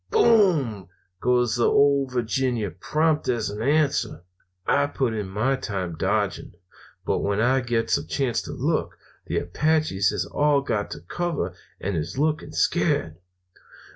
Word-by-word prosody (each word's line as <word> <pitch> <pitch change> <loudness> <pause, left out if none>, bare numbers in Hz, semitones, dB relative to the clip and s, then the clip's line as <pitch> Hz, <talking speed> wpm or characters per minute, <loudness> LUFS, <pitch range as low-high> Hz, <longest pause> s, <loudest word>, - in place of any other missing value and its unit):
"'Boom!' 180 - +3 0.3
goes 125 -1 +2
the 120 - +3
Ole 140 -1 +4
Virginia 120 -3 -1
prompt 155 - 0
as 115 -4 0
an 105 +1 -6
answer. 140 - +1 0.4
"I 145 0 +2
put 130 -5 -1
in 105 -3 -3
my 115 +8 0
time 95 -9 -4
dodging, 80 - -1 0.5
but - - +1
when 100 0 -1
I 130 +4 +3
gets 120 +2 0
a 145 - -9
chance 130 -5 0
to - - -8
look, - - -1 0.3
the - - -1
Apaches 150 - +1
has 90 - -2
all 145 - +2
got 105 -6 -2
to - - -7
cover 165 - -3 0.3
and 100 0 -2
is 80 +8 -3
looking 155 +1 0
scared. 80 0 +1
125 Hz, 145 wpm, -24 LUFS, 105-145 Hz, 0.5 s, Ole